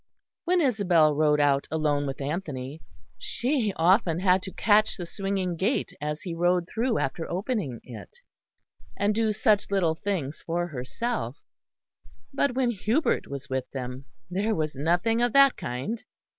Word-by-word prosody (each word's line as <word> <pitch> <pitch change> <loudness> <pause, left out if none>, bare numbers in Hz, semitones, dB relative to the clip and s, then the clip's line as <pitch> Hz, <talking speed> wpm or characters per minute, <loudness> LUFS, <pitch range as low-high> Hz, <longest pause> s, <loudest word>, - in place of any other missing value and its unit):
When 360 0 +3
Isabel 180 - +3
rode 150 0 +3
out 140 -1 +2
alone 150 -2 0
with 135 +1 -5
Anthony, 145 -2 -4 0.4
she 245 -4 0
often 170 -1 +3
had 185 0 +3
to 190 - -7
catch 215 +2 +3
the 175 - -5
swinging 195 -1 -2
gate 200 +10 0
as 150 +1 -3
he 175 - -4
rode 175 +1 +1
through 230 +2 0
after 160 +5 -2
opening 185 - -2
it, 125 - -11 0.8
and 205 +1 +2
do 220 0 +1
such 210 0 +2
little 185 -5 +2
things 160 -5 -3
for 175 +1 -1
herself; 145 - -3 1.0
but 275 -2 +1
when 255 -2 +2
Hubert 230 - 0
was 140 0 -7
with 130 -1 -3
them 130 0 -5 0.2
there 205 +5 0
was 155 -2 -2
nothing 175 - +1
of 240 -1 +1
that 275 -1 +6
kind. 130 - -4
175 Hz, 150 wpm, -27 LUFS, 150-215 Hz, 1.0 s, that